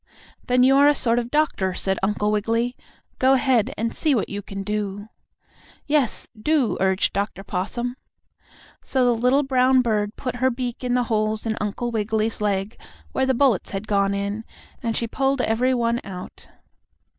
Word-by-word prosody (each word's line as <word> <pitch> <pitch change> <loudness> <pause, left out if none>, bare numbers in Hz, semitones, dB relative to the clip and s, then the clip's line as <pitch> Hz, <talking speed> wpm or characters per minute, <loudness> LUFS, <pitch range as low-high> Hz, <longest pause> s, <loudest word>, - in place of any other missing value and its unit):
"Then 250 0 +4
you 270 +1 +5
are 285 +1 +6
a 295 - +5
sort 235 -3 +2
of 235 - -3
a - - -16
doctor," 250 -11 0
said 190 +1 -1
Uncle 210 +1 0
Wiggily. 230 +4 0 0.4
"Go 260 +1 +5
ahead, 255 -4 +2
and 230 +1 -1
see 305 -4 +1
what 220 - -1
you 200 0 -4
can 195 0 -6
do." 205 0 -3 0.8
"Yes, 290 -5 0
do," 270 +2 +1
urged 190 0 +1
Dr. 200 0 -3
Possum. 225 +6 -3 0.9
So 260 -2 +1
the 245 - +4
little 250 +5 +2
brown 260 -1 +3
bird 210 -2 0
put 250 -2 -4
her 260 +1 +2
beak 245 0 -4
in 250 0 0
the 250 - +2
holes 215 -1 -1
in 220 -1 -1
Uncle 210 +3 -2
Wiggily's 220 0 -1
leg, 200 +1 -1 0.3
where 265 0 0
the 265 - +2
bullets 250 -7 +2
had 195 +2 -3
gone 200 -1 +1
in, 200 +2 -3 0.4
and 230 -1 -1
she 235 - 0
pulled 270 +3 0
every 250 +3 +1
one 235 0 0
out. 185 -2 -9
230 Hz, 180 wpm, -23 LUFS, 205-255 Hz, 0.9 s, are